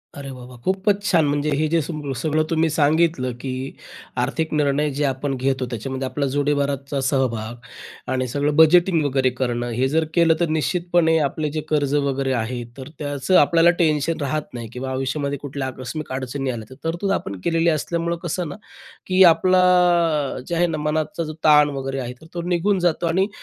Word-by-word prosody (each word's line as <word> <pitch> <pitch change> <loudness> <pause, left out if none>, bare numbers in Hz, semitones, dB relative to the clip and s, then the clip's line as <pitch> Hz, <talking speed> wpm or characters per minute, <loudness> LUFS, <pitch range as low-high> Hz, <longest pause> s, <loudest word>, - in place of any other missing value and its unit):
अरे, 140 -2 -7
वाह, 125 -1 -10
वाह! 125 -1 -13
खूपच 195 +2 +1
छान, 165 -6 +3
म्हणजे 145 +1 0
हे 155 +2 +1
जे 165 +1 +2
सग 150 -2 -5
सगळं 155 +4 +1
तुम्ही 165 0 +2
सांगितलं, 155 -3 +2
की 130 0 -4 0.5
आर्थिक 160 -1 -1
निर्णय 150 0 +1
जे - - +1
आपण 135 +1 -1
घेतो 130 0 0
त्याच्यामध्ये 130 +3 -4
आपला 140 +2 -2
जोडीदाराचा 140 -1 0
सहभाग 120 -4 -1 0.6
आणि 130 -1 0
सगळं 145 +4 -1
बजेटिंग 165 +1 +5
वगैरे 135 -2 +2
करणं, 120 -2 -1
हे 125 +3 +1
जर 160 +2 +1
केलं, 170 -2 +4
तर 170 - +2
निश्चितपणे 165 +1 +1
आपले 150 +1 -1
जे 155 +1 -3
कर्ज 145 -2 +1
वगैरे 135 -2 0
आहे, 120 +1 -2
तर 130 +2 -8
त्याचं 145 +4 +1
आपल्याला 165 +3 +5
टेन्शन 155 0 +1
राहत 145 +1 -3
नाही 120 -2 -6
किंवा 130 +1 -5
आयुष्यामध्ये 140 +2 -2
कुठल्या 140 -1 -4
आकस्मिक 130 +4 -6
अडचणी 130 +1 -3
आल्या, 110 -3 -7
तर 130 - -12
तरतूद 175 +4 -1
आपण 100 - -3
केलेली 165 0 +2
असल्यामुळं, 170 +2 -1
कसं 175 +1 -2
ना, - - -7 0.5
की 185 0 +5
आपला 185 +2 +2 0.9
जे 170 - -2
आहे 175 +1 +3
ना 160 -2 -2
मनाचा 155 +4 -2
जो 155 -1 -6
ताण 150 -1 +6
वगैरे 135 0 -3
आहे, 125 -1 -5
तर - - -14
तो 175 - -3
निघून 185 +3 +1
जातो 175 -1 +1
आणि 185 +4 +2
145 Hz, 180 wpm, -22 LUFS, 135-165 Hz, 0.9 s, ताण